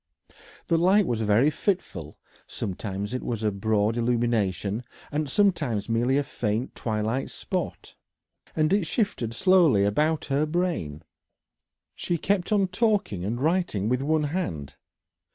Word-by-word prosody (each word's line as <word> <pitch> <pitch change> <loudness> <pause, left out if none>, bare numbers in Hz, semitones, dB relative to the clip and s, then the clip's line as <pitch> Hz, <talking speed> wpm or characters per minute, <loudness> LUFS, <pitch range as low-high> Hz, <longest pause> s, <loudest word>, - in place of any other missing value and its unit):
The 165 -1 +2
light 190 +4 +4
was 115 -5 -1
very 110 +7 +3
fitful; 125 - -3 0.3
sometimes 100 +2 -4
it 125 - -2
was 115 -2 -3
a 105 - +2
broad 105 +2 0
illumination, 115 -3 0 0.3
and 150 -1 -1
sometimes 145 - +1
merely 120 +4 +2
a 145 - +2
faint 120 -3 -2
twilight 110 +3 -2
spot, - - -4 0.6
and 155 +3 +2
it 200 -5 +2
shifted 195 - -1
slowly 180 - +4
about 150 +10 +1
her 145 +2 0
brain. 155 - -2 0.9
She 175 - -2
kept 195 +3 0
on 200 -3 +3
talking 210 - 0
and 115 +5 -2
writing 155 - 0
with 125 +1 +1
one 155 +2 +1
hand. 90 - -3
125 Hz, 135 wpm, -26 LUFS, 105-170 Hz, 0.9 s, light